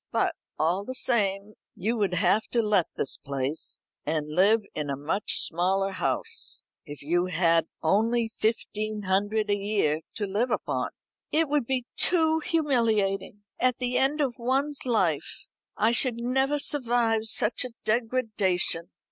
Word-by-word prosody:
But, - - +1 0.2
all 175 +5 0
the 255 +5 -6
same, 205 -5 0 0.2
you 220 +6 -1
would 200 -4 0
have 190 +4 +2
to 235 -1 +2
let 205 -5 +2
this 135 - -3
place, 140 +2 -3 0.2
and 155 0 -1
live 195 +8 +3
in 150 -2 -4
a 140 - -1
much 160 +9 0
smaller 190 +3 +1
house, 455 - -2 0.2
if 145 -1 -9
you 175 +4 +1
had 165 -2 +2 0.2
only 225 +7 +2
fifteen 215 -1 -2
hundred 205 +3 0
a - - +3
year 200 -7 0
to 210 - -2
live 210 +6 -1
upon." - - -2 0.4
"It 320 +1 +2
would 290 -5 0
be 255 -2 -1
too 320 -2 +3
humiliating! 225 -11 0 0.2
At 255 -1 +2
the 250 0 -1
end 290 +3 +1
of 255 -4 -2
one's 270 +3 -1
life. 185 - -1 0.3
I 225 - +3
should 240 0 +3
never 265 +4 0
survive 240 -6 +2
such 220 +2 +4
a 250 - -3 0.2
degradation." 215 -7 +1
215 Hz, 150 wpm, -26 LUFS, 185-245 Hz, 0.4 s, such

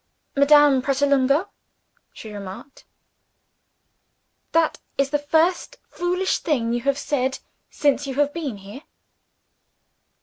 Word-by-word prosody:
"Madame 285 -1 +5
Pratolungo," 280 +5 +1 0.6
she 220 - -11
remarked, 200 +6 -10 1.7
"that 330 -1 +1 0.2
is 275 -1 0
the 295 - +1
first 325 +10 0
foolish 360 +2 -1
thing 235 -8 -1
you 240 - -1
have 275 +2 0
said, 265 -2 -1 0.3
since 285 -1 0
you 265 - -4
have 290 +1 +1
been 290 -10 -4
here." 200 +7 -11
280 Hz, 105 wpm, -22 LUFS, 260-300 Hz, 1.7 s, Madame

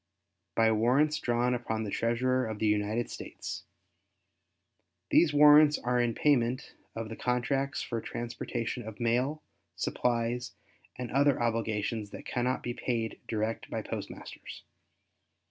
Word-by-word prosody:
By 115 -1 +4
Warrants 130 +8 +3
Drawn 120 +1 +1
upon 110 -2 -2
the 105 - -4
Treasurer 125 +3 +1
of 110 -1 -4
the 110 - -1
United 105 +2 +1
States.—These - - -6 1.7
warrants 150 0 +7
are 125 0 +1
in 120 -1 0
payment 130 -2 +1 0.2
of 115 0 -4
the 115 - -6
contracts 135 +4 0
for 115 -2 -3
transportation 120 +1 -4
of 110 - -8
mail, 125 +6 0 0.3
supplies, 120 0 -1 0.4
and 125 -1 -5
other 140 +1 +3
obligations 110 -2 -1
that - - -9
cannot 125 +1 -1
be 120 - -2
paid 115 -3 -2
direct 110 0 -2
by - - -3
postmasters. - - -7
120 Hz, 125 wpm, -30 LUFS, 115-130 Hz, 1.7 s, warrants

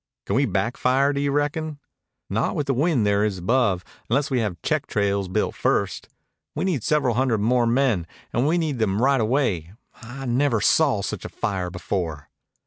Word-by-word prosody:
"Can - - -1
we 135 +1 +3
back 100 +5 -1
fire, 135 +3 +2
do 140 - -1
you 140 0 0
reckon?" 145 +1 -1 0.5
"Not - - -1
with 145 - -1
the 135 - +1
wind 135 -4 +2
there 100 0 +2
is 105 -3 0
above, 100 -1 +1 0.3
unless 140 +5 +1
we 130 - +2
have 100 -7 -2
check - - 0
trails 100 -2 0
built 90 - -1
first. - - -1 0.5
We - - -1
need 170 -10 0
several 150 -5 +2
hundred 125 -1 +1
more 120 +2 +2
men, 115 -8 +1 0.3
and 120 +5 +2
we 165 +3 +2
need 155 -7 -1
them 105 -2 +1
right 135 0 +3
away. 110 - 0 0.3
I 125 +4 -8
never 125 -1 +2
saw 130 -2 +3
such - - -4
a - - -6
fire 95 -2 -2
before." 85 -5 -4
120 Hz, 190 wpm, -23 LUFS, 100-140 Hz, 0.5 s, we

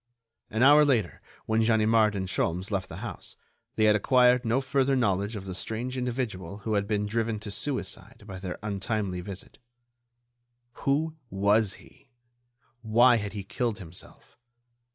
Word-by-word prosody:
An 110 +3 +1
hour 145 +2 +8
later, 120 - +1 0.2
when 110 0 +1
Ganimard 110 -1 +3
and 95 -1 -2
Sholmes 90 +2 -2
left 95 -2 -2
the - - -7
house, - - -7 0.4
they 110 - +1
had 105 -1 +5
acquired 125 +3 +4
no 120 +2 +1
further 135 0 +1
knowledge 100 -3 0
of 100 -2 -6
the 95 - -5
strange 115 +7 -4
individual 115 -8 -3
who 110 - -1
had 100 -1 0
been 105 -1 0
driven 110 0 -1
to 105 -1 -6
suicide 135 -2 -4
by 95 -3 -8
their 90 -2 -5
untimely 100 -2 -2
visit. 95 +1 -10 1.3
Who 155 +3 +1
was 100 0 +2
he? 135 - -20 0.7
Why 120 +2 +5
had 105 -2 -4
he 100 -2 -5
killed 115 +2 -2
himself? 90 +2 -12
110 Hz, 155 wpm, -27 LUFS, 100-125 Hz, 1.3 s, hour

